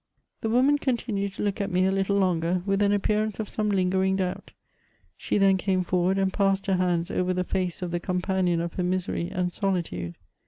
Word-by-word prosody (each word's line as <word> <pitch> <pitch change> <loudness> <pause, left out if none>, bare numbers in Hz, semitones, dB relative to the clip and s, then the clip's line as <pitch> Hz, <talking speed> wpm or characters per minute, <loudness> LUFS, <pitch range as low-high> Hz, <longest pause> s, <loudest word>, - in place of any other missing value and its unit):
The 225 - -1
woman 265 +5 +3
continued 220 -7 -1
to - - -4
look 205 +1 -1
at 200 - -1
me 185 0 +2
a 190 - +2
little 195 +1 +1
longer, 180 -2 +1
with 195 0 +1
an 200 0 +3
appearance 210 +1 0
of 215 - -2
some 210 0 -1
lingering 190 0 +2
doubt. 185 -2 -3 0.7
She - - -1
then 195 -1 +4
came 185 0 0
forward, 180 +1 +1
and 190 -1 +1
passed 195 -1 +1
her 190 -2 +1
hands 175 -2 0
over 185 0 0
the 180 - 0
face 180 -1 -2
of 175 - -3
the 175 - -1
companion 180 -1 0
of 170 0 -4
her 180 - -2
misery 180 -1 -1
and 180 -1 -2
solitude. 165 - -2
190 Hz, 205 wpm, -26 LUFS, 180-200 Hz, 0.7 s, then